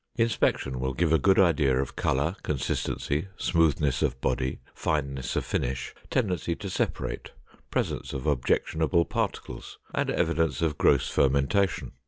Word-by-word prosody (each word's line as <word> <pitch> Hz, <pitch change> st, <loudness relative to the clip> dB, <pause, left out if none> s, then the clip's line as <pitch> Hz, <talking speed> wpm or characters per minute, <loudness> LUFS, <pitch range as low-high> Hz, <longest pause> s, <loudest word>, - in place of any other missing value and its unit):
Inspection 115 Hz, -, +1 dB
will 65 Hz, 0 st, -2 dB
give 80 Hz, +1 st, +2 dB
a 80 Hz, -, +5 dB
good 95 Hz, +7 st, +4 dB
idea 75 Hz, -8 st, +4 dB
of 65 Hz, -, -3 dB
color, 75 Hz, +7 st, 0 dB
consistency, 75 Hz, +2 st, -2 dB
smoothness 75 Hz, -5 st, +2 dB
of 65 Hz, -4 st, 0 dB
body, 65 Hz, 0 st, -1 dB
fineness 70 Hz, -5 st, -2 dB
of -, -, 0 dB
finish, 65 Hz, +1 st, -2 dB, 0.2 s
tendency 90 Hz, -8 st, 0 dB
to 100 Hz, +1 st, -6 dB
separate, -, -, -2 dB, 0.4 s
presence -, -, -2 dB
of 65 Hz, 0 st, -5 dB
objectionable 80 Hz, +3 st, +1 dB
particles, -, -, -4 dB, 0.2 s
and -, -, 0 dB
evidence 80 Hz, 0 st, +1 dB
of 80 Hz, -3 st, 0 dB
gross -, -, +4 dB
fermentation. 70 Hz, +8 st, +1 dB
75 Hz, 135 wpm, -27 LUFS, 65-85 Hz, 0.4 s, a